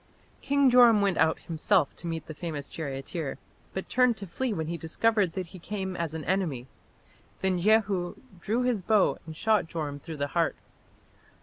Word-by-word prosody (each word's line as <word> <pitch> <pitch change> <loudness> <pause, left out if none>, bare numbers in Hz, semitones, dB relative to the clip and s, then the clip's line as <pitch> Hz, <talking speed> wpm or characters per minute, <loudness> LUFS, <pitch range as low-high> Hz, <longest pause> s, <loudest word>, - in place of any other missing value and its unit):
King 280 -2 +3
Joram 240 -4 +7
went 195 -3 +1
out 160 0 +3
himself 165 0 +1
to 170 - -6
meet 165 -2 -4
the 155 - -7
famous 150 -3 -5
charioteer, 140 +1 -4 0.3
but 190 - -5
turned 250 -2 +3
to 200 - -6
flee 245 +8 -2
when 160 -6 -2
he 170 +2 -3
discovered 190 +3 +1
that 185 -1 -3
he 185 - -9
came 190 0 -4
as 165 -2 -3
an 155 - -5
enemy. 170 -10 -1 0.8
Then 190 -2 +1
Jehu 195 -3 +2 0.2
drew 225 +8 0
his 245 -5 +1
bow 210 +1 +3
and 160 -1 -8
shot 215 -4 +2
Joram 150 -3 -4
through 160 +2 -8
the 145 0 -2
heart. 170 -2 +1
180 Hz, 180 wpm, -28 LUFS, 160-210 Hz, 0.8 s, Joram